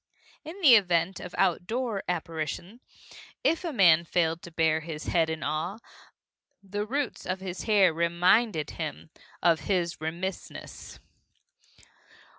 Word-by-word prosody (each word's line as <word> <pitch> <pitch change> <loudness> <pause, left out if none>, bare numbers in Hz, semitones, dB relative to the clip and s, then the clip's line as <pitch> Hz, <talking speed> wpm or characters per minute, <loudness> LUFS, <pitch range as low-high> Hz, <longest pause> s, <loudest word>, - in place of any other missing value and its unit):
In 335 +5 -9
the 285 -8 +8
event 180 -4 +3
of 180 - -8
outdoor 200 +4 0
apparition, 165 +5 -4 0.6
if 330 - +2
a 340 - -2
man 170 - +5
failed 165 -1 0
to - - -10
bare 160 -1 +2
his 160 -1 -7
head 165 -2 +1
in 160 -2 -4
awe, 155 +7 -2 0.9
the 205 +2 -4
roots 275 +2 -2
of 185 +1 -3
his 185 -1 -6
hair 200 -6 +4
reminded 170 +1 +2
him 160 0 -6 0.3
of 165 -2 +4
his 175 -4 0
remissness. 175 +4 -6
175 Hz, 125 wpm, -27 LUFS, 160-205 Hz, 0.9 s, the